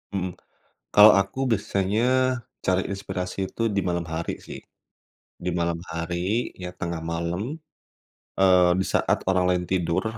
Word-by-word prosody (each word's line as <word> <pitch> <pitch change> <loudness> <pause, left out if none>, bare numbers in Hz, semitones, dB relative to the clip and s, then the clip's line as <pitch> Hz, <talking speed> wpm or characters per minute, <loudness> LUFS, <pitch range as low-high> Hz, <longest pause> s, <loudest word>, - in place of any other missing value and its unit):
Mhm. 95 -1 -2 0.6
Kalau, 105 +1 +10
aku 95 +6 -3
biasanya 100 0 0 0.6
cari 95 0 +2
inspirasi 95 -2 -4
itu, - - -6
di 100 - +2
malam 85 -1 -1
hari, 80 +1 -3
sih, - - -9 0.8
di 90 - -3
malam 85 0 0
hari, 85 +7 -2
ya, 90 0 -6
tengah 85 -1 -4
malam, 85 - -3 0.8
eee, 90 -2 +5
di - - +1
saat - - +2
orang 90 -1 +2
lain 90 0 0
tidur, 85 -1 0
90 Hz, 135 wpm, -25 LUFS, 85-95 Hz, 0.8 s, Kalau